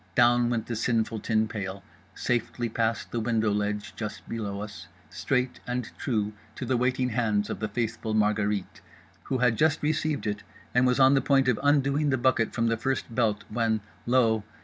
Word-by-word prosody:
Down 120 -1 +4
went 115 -2 -1
the 120 - -4
sinful 115 -1 0
tin 110 0 +1
pail, 95 -2 -5 0.3
safely 120 0 -1
past 115 0 -1
the 120 - -1
window 110 -1 +1
ledge 105 0 -2
just 105 -1 -6
below 105 -3 -4
us, 105 0 -8 0.2
straight 125 -1 -1
and 125 -2 -3
true 110 -5 -1 0.2
to - - -5
the 130 - +1
waiting 125 +1 +1
hands 110 -4 0
of - - -4
the 110 - -1
faithful 110 0 -2
Margherite—who 105 +4 -2
had 125 -3 +2
just 155 -1 +2
received 155 0 0
it 105 -1 -2 0.3
and 125 +1 +4
was 125 +1 +2
on 130 +1 +7
the 135 - +4
point 135 -1 +3
of 125 -4 +2
undoing 145 +1 +2
the 130 - +2
bucket 120 -2 +2
from 115 - 0
the 115 0 +1
first 130 -1 -2
belt 110 -4 +1
when, 110 -1 +1 0.3
lo! 115 -4 +3
115 Hz, 180 wpm, -27 LUFS, 110-125 Hz, 0.3 s, on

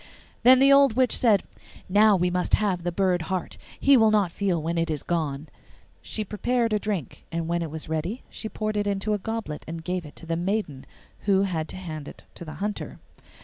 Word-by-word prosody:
Then 255 +2 +8
the 275 +1 +6
old 275 -3 +6
witch 255 +1 +2
said, 215 -5 +3 0.4
'Now 210 +2 +5
we 180 -1 +1
must 180 0 +2
have 195 -4 0
the 175 +1 -2
bird 180 -1 +1
heart; 185 -2 -3 0.2
he 280 0 +6
will 220 -2 +5
not 205 -5 +2
feel 185 -2 0
when 165 +2 -2
it 165 - 0
is 150 -2 -3
gone.' 155 -3 -2 0.5
She 215 - -3
prepared 230 +3 0
a 210 - +2
drink, 200 - -4
and 165 -1 -2
when 170 0 0
it 165 - -3
was 155 +1 -7
ready 160 +10 -3
she 220 - -7
poured 215 -1 -3
it 205 0 0
in 200 -1 0 0.2
a - - +1
goblet 220 -7 -5
and 165 0 -6
gave 180 +1 -2
it 145 - -14
to - - -11
the 165 0 -1
maiden, 175 -6 -2 0.4
who 195 -1 +3
had 165 -5 -2
to - - -5
hand 155 -5 -7
it - - -11
to - - -10
the 155 -2 -8
hunter. 205 +1 -4
185 Hz, 220 wpm, -25 LUFS, 165-215 Hz, 0.5 s, Then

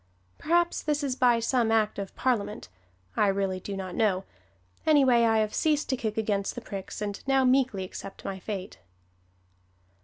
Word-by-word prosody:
Perhaps 345 +2 +1
this 300 -1 -1
is 265 -3 -1
by 245 -2 +4
some 230 -1 +1
Act 215 -2 +1
of 195 -1 -6
Parliament 225 -5 -1 0.5
I 210 - +3
really 195 -1 0
do 195 +1 -6
not 185 -1 -5
know; 195 -4 +1 0.6
anyway, 265 -6 +5
I 225 -1 +3
have 215 -1 0
ceased 305 -2 +1
to 265 - +2
kick 220 -3 -3
against 205 -3 -1
the 245 - -5
pricks 200 -1 -6
and 205 -1 -4
now 270 -1 +3
meekly 255 -6 +2
accept 195 +1 -9
my 190 -1 -4
fate. 190 -1 -6
220 Hz, 165 wpm, -27 LUFS, 200-260 Hz, 0.6 s, anyway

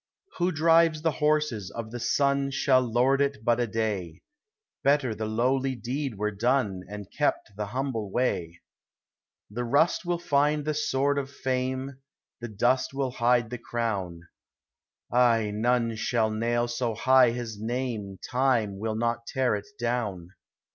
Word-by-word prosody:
Who 175 +1 +2
drives 165 -1 +3
the 165 - +3
horses 150 - 0
of 110 +3 -7
the 120 - -5
sun 140 +2 +1
Shall 135 -1 +3
lord 125 +3 +2
it 140 -5 -1
but 120 0 +3
a 120 - +1
day; 105 -7 -3 0.6
P>etter 140 -5 +2
the 110 0 -3
lowly 130 +4 0
deed 130 +1 -3
were 105 +1 -1
done. 105 -3 0
And 105 0 -7
kept - - 0
the 105 0 -4
humble 115 -2 -3
way. 85 -8 -1 0.9
The 120 +4 -3
rust 145 +11 +2
will 175 -1 -1
find 150 -2 +1
the 155 - 0
sword 140 -1 +1
of 135 -1 -5
fame. 130 0 -3 0.4
The 120 - -5
dust 125 +5 0
will 135 -2 -1
hide 120 -1 +2
the 125 - -5
crown; 100 -8 -3 0.9
Ay, 115 -3 +3
none 115 +1 +1
shall 110 -2 +1
nail 120 +2 0
so 120 -1 -2
high 130 +2 +5
his 115 -3 -5
name 115 -4 -3
Time 120 -6 +1
will 110 +1 -2
not 115 +1 -1
tear 130 -3 +1
it 105 -1 -4
down. 115 -8 -2
120 Hz, 150 wpm, -27 LUFS, 110-135 Hz, 0.9 s, high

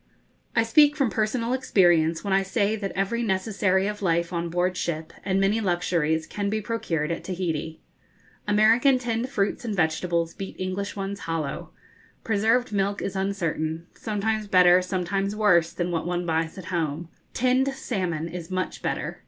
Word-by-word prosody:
I 230 - +4
speak 290 +6 +5
from 275 -6 +1
personal 230 +2 0
experience 175 -10 +3
when 200 -2 -1
I 195 - +4
say 200 +2 0
that 200 -2 -4
every 195 +5 0
necessary 190 -2 +1
of 210 0 -3
life 170 -2 0
on 170 0 -2
board 180 +2 0
ship, 160 -3 -3
and 190 0 +1
many 200 +3 +2
luxuries, 170 -4 0
can 200 +5 -3
be 215 +1 0
procured 175 -8 -2
at 170 - -4
Tahiti. 165 -4 -3 0.7
American 225 +6 +5
tinned 240 0 -2
fruits 205 -5 -1
and 220 -3 -3
vegetables 170 0 0
beat 195 - -7
English 185 +3 -3
ones 200 0 -4
hollow. 165 -4 -4 0.5
Preserved 225 +3 +1
milk 200 0 0
is 195 - -4
uncertain 170 -4 -2
sometimes 215 0 -2
better, 180 -1 +6
sometimes 195 +2 -2
worse, 175 -6 +3
than 175 0 -2
what 165 0 -2
one 175 0 -1
buys 160 +1 -1
at 185 -1 -7
home. 160 -1 -2 0.3
Tinned 255 +2 +2
salmon 180 - -2
is 170 0 -7
much 185 0 -3
better. - - -3
190 Hz, 160 wpm, -25 LUFS, 170-215 Hz, 0.7 s, better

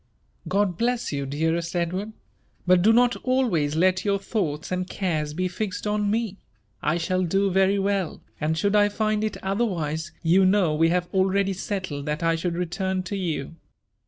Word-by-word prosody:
''God 195 -3 +1
bless 245 0 0
you, 140 -1 -2
dearest 160 +4 -1
Edward! 185 +5 -2 0.3
— - - -39
but 180 0 +5
do 215 +5 +5
not 245 +1 +4
always 215 - +1
let 185 +3 +2
your 200 -1 +1
thoughts 185 -7 -3
and 185 0 -2
cares 155 -6 -2
be 185 +2 0
fixed 185 +2 -4
on 210 0 0
me. 215 -2 -1 0.4
I 155 +2 +1
shall 185 +2 0
do 195 +3 +1
very 190 +2 +3
well; 195 -3 -1 0.2
and 155 +1 0
should 200 +5 +1
I 205 0 +5
find 215 0 0
it 215 - -2
otherwise, 170 -6 -1
you 175 +4 +4
know 185 -4 +3
we 165 +2 +3
have 175 0 0
already 195 +1 +2
settled 185 -7 -4
that 150 +2 -2
I 165 0 +3
should 170 +1 -2
return 185 +2 -2
to 185 +3 -4
you. 165 -4 -3
185 Hz, 180 wpm, -25 LUFS, 165-200 Hz, 0.4 s, but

